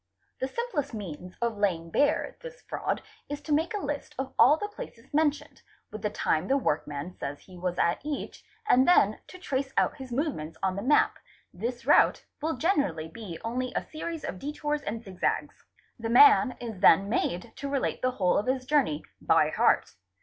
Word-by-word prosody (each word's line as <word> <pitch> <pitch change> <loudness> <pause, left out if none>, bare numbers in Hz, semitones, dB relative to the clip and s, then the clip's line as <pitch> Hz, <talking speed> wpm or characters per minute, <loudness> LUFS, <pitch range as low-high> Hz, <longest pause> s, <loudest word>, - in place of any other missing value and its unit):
The 260 - -1
simplest 295 - -3
means 180 -3 -7
of 230 -3 -1
laying 170 -5 0
bare 290 - +1
this - - -10
fraud - - -3 0.3
is 290 0 -4
to 305 - -2
make 325 +8 +1
a 405 - -3
list 295 +1 -4
of 265 0 -4
all 295 +4 +7
the 415 - -3
places 410 - -11
mentioned, 300 -1 0 0.3
with 215 - -7
the 210 - 0
time 160 -3 0
the 275 - +3
workman 150 - -2
says 140 +1 -5
he 185 - -15
was 175 0 -3
at 170 - +2
each, 295 -1 -5 0.2
and 260 -8 +5
then 215 - +5
to 370 - -11
trace 275 -7 -2
out - - +2
his 260 -2 -9
movements 240 - -2
on 190 -1 +1
the 200 - -3
map; 290 +6 +3 0.3
this 240 +7 -4
route - - +4 0.2
will 320 +2 -1
generally 195 - 0
be 180 -2 -8
only 250 +2 -2
a - - 0
series 320 +1 -5
of 185 - -5
detours 295 +2 -2
and 225 -1 -5
zig 190 -4 -12
zags. - - -1 0.4
The 225 0 -3
man 275 - +7
is 225 -5 -6
then 195 0 +6
made 180 -5 -1
to 280 - -4
relate 275 -1 -1
the 255 - +2
whole 185 -8 +2
of 210 - -4
his 260 0 0
journey, 255 - +1 0.2
by - - +3
heart. - - +2
255 Hz, 195 wpm, -28 LUFS, 190-295 Hz, 0.4 s, all